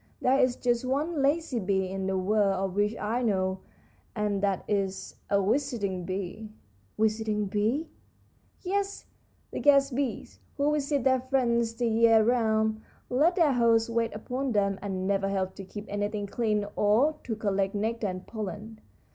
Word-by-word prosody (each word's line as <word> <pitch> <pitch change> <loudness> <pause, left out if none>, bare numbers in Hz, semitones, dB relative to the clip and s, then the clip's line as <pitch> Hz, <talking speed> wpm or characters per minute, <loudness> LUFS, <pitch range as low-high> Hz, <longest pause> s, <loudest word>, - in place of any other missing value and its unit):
There 260 +2 +3
is 255 -2 +3
just 240 -1 0
one 285 +4 -1
lazy 285 -2 +1
bee 190 -1 0
in 190 0 -3
the 190 0 0
world 200 +1 +2
of 190 0 -2
which 205 +2 +1
I 225 +4 -1
know, 190 -4 0 0.6
and 210 -2 -1
that 200 -2 0
is 195 -2 -2
a 200 - +3
visiting 205 -4 -1
bee." 195 +3 -5 0.5
"Visiting 215 -1 0
bees?" 215 +10 0 0.8
"Yes, 400 +1 -2 0.5
the - - -4
guest 275 -2 +4
bees, 265 -2 -3 0.2
who 290 +1 +2
visit 285 -2 0
their 260 0 +3
friends 235 -3 +1
the 240 +1 -1
year 225 0 +5
round, 220 -2 +1 0.3
let 305 +8 +3
their 320 -6 +4
hosts 230 -1 +3
wait 230 0 0
upon 250 +4 -3
them, 200 -2 +1
and 190 -2 -3
never 195 0 +1
help 190 -1 -1
to 195 - -9
keep 205 +2 -8
anything 205 0 -2
clean 210 0 0
or 225 +9 +3
to 225 - -3
collect 200 -2 -1
nectar 220 +1 -1
and 185 -1 -5
pollen. 215 +1 -7
220 Hz, 160 wpm, -28 LUFS, 200-250 Hz, 0.8 s, year